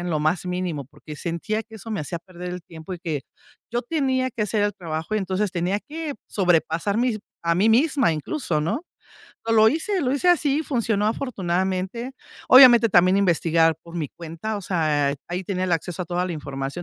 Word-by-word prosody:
en 175 Hz, 0 st, -3 dB
lo 155 Hz, -, +1 dB
más 155 Hz, +4 st, +1 dB
mínimo, 180 Hz, -6 st, -3 dB
porque 150 Hz, +2 st, -11 dB
sentía 180 Hz, +8 st, -3 dB
que 220 Hz, 0 st, -13 dB
eso 225 Hz, +1 st, -9 dB
me 210 Hz, -, -2 dB
hacía 160 Hz, +3 st, -4 dB
perder 180 Hz, +1 st, -9 dB
el 180 Hz, -1 st, -6 dB
tiempo 165 Hz, +2 st, -8 dB
y 175 Hz, -, -9 dB
que 155 Hz, -6 st, -3 dB, 0.5 s
yo 240 Hz, -, +1 dB
tenía 260 Hz, -2 st, 0 dB
que 235 Hz, -3 st, -3 dB
hacer 210 Hz, 0 st, 0 dB
el 205 Hz, -, 0 dB
trabajo; 165 Hz, +1 st, -4 dB
y -, -, +2 dB
entonces, 195 Hz, 0 st, -1 dB
tenía 180 Hz, +3 st, 0 dB
que 305 Hz, +1 st, -6 dB
sobrepasar 175 Hz, +1 st, +1 dB
mis 240 Hz, -3 st, +1 dB, 0.3 s
a 170 Hz, 0 st, +2 dB
mí 200 Hz, +5 st, +3 dB
misma 265 Hz, -, +3 dB
incluso, 155 Hz, -, -2 dB
¿no? 170 Hz, -, -2 dB, 0.6 s
Pero 225 Hz, 0 st, +1 dB
lo 220 Hz, 0 st, +7 dB
hice 360 Hz, -, -1 dB
lo 255 Hz, -, +1 dB
hice 285 Hz, +6 st, +1 dB
así, 310 Hz, -3 st, +3 dB
funcionó 225 Hz, -7 st, 0 dB
afortunadamente. 190 Hz, 0 st, -2 dB, 0.4 s
Obviamente, 245 Hz, -3 st, +9 dB
también 185 Hz, -1 st, +5 dB
investigar 165 Hz, -4 st, +3 dB
por 170 Hz, -, -12 dB
mi 150 Hz, -5 st, -2 dB
cuenta, 170 Hz, +6 st, -6 dB
o 205 Hz, -, -5 dB
sea, 150 Hz, -6 st, +1 dB
ahí 180 Hz, +2 st, -3 dB
tenía 185 Hz, -1 st, -2 dB
el 185 Hz, -, -2 dB
acceso 175 Hz, +2 st, -2 dB
a -, -, -9 dB
toda 180 Hz, +2 st, -1 dB
la 180 Hz, -, -3 dB
información, 140 Hz, +1 st, -5 dB
185 Hz, 200 wpm, -23 LUFS, 170-230 Hz, 0.6 s, Obviamente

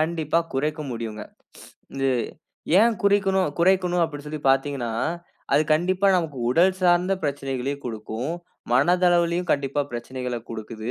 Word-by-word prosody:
கண்டிப்பா 160 Hz, 0 st, 0 dB, 0.2 s
குறைக்க 150 Hz, +3 st, -1 dB
முடியுங்க, 110 Hz, -2 st, -5 dB, 0.7 s
இது 135 Hz, 0 st, +1 dB, 0.7 s
ஏன் 230 Hz, +1 st, +4 dB
குறிக்கனும் 195 Hz, -3 st, +2 dB
குறைக்கனும் 180 Hz, -1 st, +3 dB
அப்படினு 145 Hz, -2 st, -7 dB
சொல்லி 155 Hz, -1 st, -5 dB
பார்த்தீங்கனா 135 Hz, -3 st, 0 dB, 0.6 s
அது, 150 Hz, -, +5 dB
கண்டிப்பா 185 Hz, +4 st, +1 dB
நமக்கு 160 Hz, -7 st, -2 dB
உடல் 175 Hz, +8 st, +4 dB
சார்ந்த 180 Hz, +1 st, +3 dB
பிரச்சனைகளையும் 140 Hz, -1 st, -3 dB
குடுக்கும், 115 Hz, +5 st, -4 dB, 0.4 s
மனதளவிலும் 175 Hz, +4 st, +3 dB
கண்டிப்பா 140 Hz, 0 st, -1 dB
பிரச்சனைகளை 125 Hz, 0 st, -4 dB
குடுக்குது, 110 Hz, +1 st, -6 dB
150 Hz, 115 wpm, -24 LUFS, 130-175 Hz, 0.7 s, அது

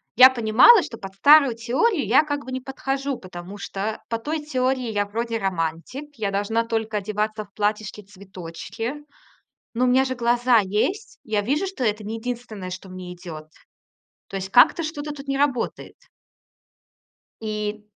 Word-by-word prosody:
я 255 Hz, +1 st, +10 dB
понимала, 250 Hz, -, +6 dB
что 245 Hz, -6 st, -8 dB
под 195 Hz, 0 st, -9 dB
старую 280 Hz, +1 st, +6 dB
теорию 260 Hz, -, +1 dB
я 255 Hz, +9 st, +5 dB
как 290 Hz, -1 st, -4 dB
бы 260 Hz, -, -7 dB
не 260 Hz, 0 st, -3 dB
подхожу, 270 Hz, 0 st, -3 dB
потому 180 Hz, +1 st, -9 dB
что 200 Hz, +2 st, -4 dB
по 230 Hz, -, -1 dB
той 305 Hz, +6 st, -3 dB
теории 255 Hz, -4 st, -1 dB
я 205 Hz, -1 st, 0 dB
вроде 230 Hz, +2 st, -3 dB
романтик, 190 Hz, -, -3 dB
я 205 Hz, -2 st, -1 dB
должна 205 Hz, +3 st, 0 dB
только 225 Hz, -2 st, -2 dB
одеваться 215 Hz, +1 st, -2 dB
в -, -, -31 dB
платьишки-цветочки. 205 Hz, -, -5 dB, 0.7 s
Но 250 Hz, +2 st, +2 dB
у -, -, +2 dB
меня 260 Hz, +2 st, +4 dB
же 260 Hz, -, -3 dB
глаза 240 Hz, 0 st, +3 dB
есть. 215 Hz, -, -2 dB
Я 215 Hz, -2 st, 0 dB
вижу, 285 Hz, -, 0 dB
что 375 Hz, -9 st, -5 dB
это 215 Hz, -2 st, 0 dB
не 215 Hz, +2 st, -4 dB
единственное, 225 Hz, -5 st, -6 dB
что 185 Hz, +1 st, -8 dB
мне 185 Hz, -1 st, -8 dB
идёт. 160 Hz, -3 st, -9 dB, 0.8 s
То 195 Hz, -, -5 dB
есть 190 Hz, 0 st, -5 dB
как-то 245 Hz, -, +5 dB
что-то 300 Hz, -1 st, -4 dB
тут 280 Hz, -1 st, -10 dB
не 275 Hz, 0 st, -1 dB
работает. 275 Hz, -4 st, -1 dB, 1.5 s
И 210 Hz, -1 st, -4 dB
225 Hz, 160 wpm, -23 LUFS, 205-265 Hz, 1.5 s, я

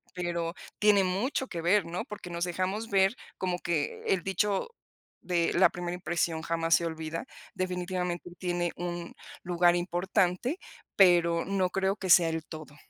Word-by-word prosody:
pero 170 Hz, -2 st, -2 dB, 0.3 s
tiene 210 Hz, -2 st, +5 dB
mucho 200 Hz, +9 st, -1 dB
que 170 Hz, -7 st, -5 dB
ver, 185 Hz, +3 st, +3 dB
¿no?, 170 Hz, +2 st, -4 dB
porque 205 Hz, -4 st, -8 dB
nos 170 Hz, 0 st, -2 dB
dejamos 185 Hz, +5 st, -2 dB
ver 195 Hz, +2 st, +3 dB, 0.2 s
como 180 Hz, -1 st, -2 dB
que 165 Hz, -5 st, -2 dB
el 185 Hz, -3 st, +1 dB
dicho 195 Hz, +1 st, 0 dB, 0.5 s
de 175 Hz, -2 st, +1 dB
la 185 Hz, -, +5 dB
primera 175 Hz, -1 st, -4 dB
impresión 175 Hz, -2 st, -1 dB
jamás 165 Hz, 0 st, +2 dB
se 170 Hz, -, +1 dB
olvida. 160 Hz, 0 st, -4 dB, 0.3 s
Definitivamente 180 Hz, -1 st, -3 dB
tiene 175 Hz, -1 st, -1 dB
un 175 Hz, 0 st, -5 dB, 0.3 s
lugar 175 Hz, 0 st, +3 dB
importante, 180 Hz, -, 0 dB, 0.4 s
pero 170 Hz, -3 st, +5 dB
no 190 Hz, -1 st, +1 dB
creo 190 Hz, +1 st, 0 dB
que 190 Hz, -, -5 dB
sea 170 Hz, -1 st, +7 dB
el 160 Hz, -1 st, -3 dB
todo. 155 Hz, -2 st, -10 dB
175 Hz, 155 wpm, -29 LUFS, 170-190 Hz, 0.5 s, sea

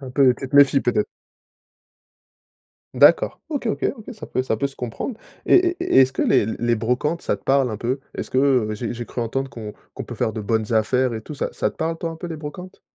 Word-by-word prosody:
Un 130 Hz, -2 st, -8 dB
peu, 130 Hz, -1 st, +4 dB
tu 135 Hz, -, -6 dB
te 140 Hz, -, 0 dB
méfies, 140 Hz, -1 st, +6 dB
peut-être? 210 Hz, +8 st, 0 dB, 1.9 s
D'accord, -, -, +5 dB
OK, 285 Hz, -5 st, -3 dB
OK. 220 Hz, -, -1 dB
OK, 225 Hz, +2 st, -9 dB
ça 215 Hz, -, -9 dB
peut 130 Hz, -, -1 dB
ça 110 Hz, -4 st, -1 dB
peut 140 Hz, -, 0 dB
se 135 Hz, -, -11 dB
comprendre, 125 Hz, -, -5 dB, 0.3 s
et -, -, +6 dB
et 355 Hz, -1 st, +3 dB
et 365 Hz, -, +5 dB
est-ce 130 Hz, 0 st, +4 dB
que -, -, -1 dB
les -, -, +3 dB
les 120 Hz, +2 st, 0 dB
brocantes, 125 Hz, +9 st, -1 dB
ça -, -, -1 dB
te -, -, -25 dB
parle 135 Hz, -2 st, +3 dB
un 110 Hz, -, -4 dB
peu? 125 Hz, +5 st, -2 dB
Est-ce -, -, -5 dB
que 130 Hz, -4 st, +3 dB
j'ai 115 Hz, +2 st, -4 dB
j'ai 120 Hz, 0 st, -5 dB
cru 120 Hz, -, -5 dB
entendre 135 Hz, +4 st, -2 dB
qu'on 110 Hz, -3 st, -8 dB, 0.2 s
qu'on -, -, -7 dB
peut -, -, -8 dB
faire 110 Hz, -, -1 dB
de 110 Hz, -, -5 dB
bonnes 110 Hz, +1 st, -1 dB
affaires 120 Hz, +3 st, +2 dB
et 110 Hz, -, -4 dB
tout, 150 Hz, +7 st, -9 dB
ça -, -, -3 dB
ça -, -, -1 dB
te -, -, -23 dB
parle 165 Hz, +1 st, -2 dB
toi 165 Hz, -, -3 dB
un 165 Hz, -, -8 dB
peu 170 Hz, -, -7 dB
les 165 Hz, -, -5 dB
brocantes? 170 Hz, +5 st, -9 dB
130 Hz, 245 wpm, -22 LUFS, 115-160 Hz, 1.9 s, méfies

